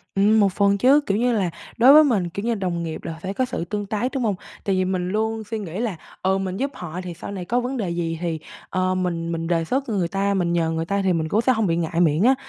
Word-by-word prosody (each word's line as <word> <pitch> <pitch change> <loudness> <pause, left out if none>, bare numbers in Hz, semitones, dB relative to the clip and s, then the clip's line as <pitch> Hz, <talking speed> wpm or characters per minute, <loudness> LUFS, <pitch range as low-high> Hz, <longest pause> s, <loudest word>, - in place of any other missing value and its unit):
Ừm, 210 +3 +4
một 200 -3 +3
phần 200 0 +3
chứ, 270 +7 +5
kiểu 195 - +1
như 245 +2 +2
là 195 -5 +1 0.3
đối 250 +4 +8
với 310 +1 +9
mình, 210 - +1
kiểu 200 +5 -5
như, 235 -1 +1
đồng 180 -4 -2
nghiệp 160 -1 -5
là - - -4
phải 190 +2 -4
có 255 +5 0
sự 170 - -4
tương 205 +3 -3
tác, 215 +5 -2
đúng 265 -3 -1
hông? 210 -4 +1 0.3
Tại 195 - +1
vì 185 0 +1
mình 185 -1 -1
luôn 220 +2 -1
suy 225 - -1
nghĩ 185 -2 -5
là, 225 -5 -1 0.3
ừ, 190 +1 +2
mình 190 -1 -3
giúp 275 +4 -1
họ 175 0 -6
thì 180 -1 -6
sau 170 - -8
này 190 -3 -5
có 240 +7 +1
vấn 250 +2 -3
đề 205 -7 -2
gì 170 -1 -2
thì, 165 -2 -2 0.3
ờ, 185 0 0
mình 170 -2 -2
mình 165 0 -3
đề 165 -1 +1
xuất 260 +10 -1
người 195 -6 0
ta, 200 +2 0
mình 175 -3 0
nhờ 165 -1 +1
người 165 0 -2
ta 200 +3 0
thì 190 -1 +2
mình 160 -2 -1
cũng 215 - +2
sẽ 255 +2 +3
hông 220 -3 +1
bị 165 - +1
ngại 170 0 -1
miệng 160 +1 +3
á. 260 +3 +5
195 Hz, 295 wpm, -23 LUFS, 170-220 Hz, 0.3 s, với